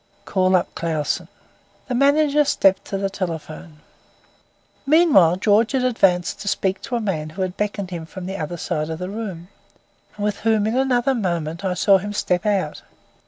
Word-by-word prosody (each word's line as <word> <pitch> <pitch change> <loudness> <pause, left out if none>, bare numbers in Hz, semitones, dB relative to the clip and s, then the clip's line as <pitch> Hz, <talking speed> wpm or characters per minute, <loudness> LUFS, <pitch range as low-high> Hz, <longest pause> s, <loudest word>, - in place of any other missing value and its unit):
"Call 185 -1 +2
up 180 - 0
Clausen." 160 -3 -2 0.6
The 255 - -3
manager 285 +3 +3
stepped 195 -8 +2
to 195 - -3
the 195 0 -1
telephone. 165 -4 -6 1.0
Meanwhile, 280 - +5
George 210 +5 +2
had 260 -2 +1
advanced 190 -8 +1
to 205 - -7
speak 190 -1 0
to 250 - -4
a - - 0
man 170 -8 -2
who 185 +5 -4
had 185 0 -4
beckoned 205 -2 -3
to 180 - -5
him 160 -1 -9
from 185 +1 -8
the 190 +1 -5
other 160 +1 -4
side 155 -1 -3
of 160 - -4
the 180 +2 -5
room, 190 -5 -6 0.7
and 205 - -4
with 205 -1 -1
whom 220 -2 +1
in 220 +2 0
another 260 0 +2
moment 170 -6 -2
I 185 -2 -1
saw 195 +1 +4
him 205 +2 -5
step 180 -1 0
out. 190 -7 -1
195 Hz, 185 wpm, -21 LUFS, 175-220 Hz, 1.0 s, Meanwhile